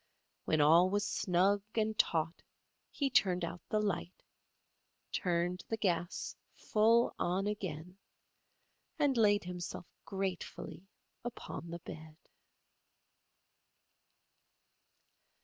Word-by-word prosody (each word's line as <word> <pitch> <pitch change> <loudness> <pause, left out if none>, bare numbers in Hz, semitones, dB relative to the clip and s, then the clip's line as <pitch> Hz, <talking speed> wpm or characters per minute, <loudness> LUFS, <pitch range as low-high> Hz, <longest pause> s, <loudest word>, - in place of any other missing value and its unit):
When 155 - +3
all 165 +5 +6
was 205 +1 +1
snug 190 +3 +2
and 220 -1 +1
taut 165 -4 +1 0.5
he 280 - -1
turned 180 -6 +3
out 175 +1 -6
the 215 - +2
light, 200 -3 -2 0.9
turned 175 0 0
the 225 - -1
gas 175 -4 -1 0.2
full 230 +2 +3
on 185 +3 +1
again 185 -3 -4 1.0
and 290 -4 +3
laid 205 -3 +4
himself 180 -1 -5 0.2
gratefully 190 -1 -4 0.4
upon 230 -7 -6
the 170 - -4
bed. 155 0 -9
185 Hz, 95 wpm, -34 LUFS, 170-210 Hz, 1.0 s, all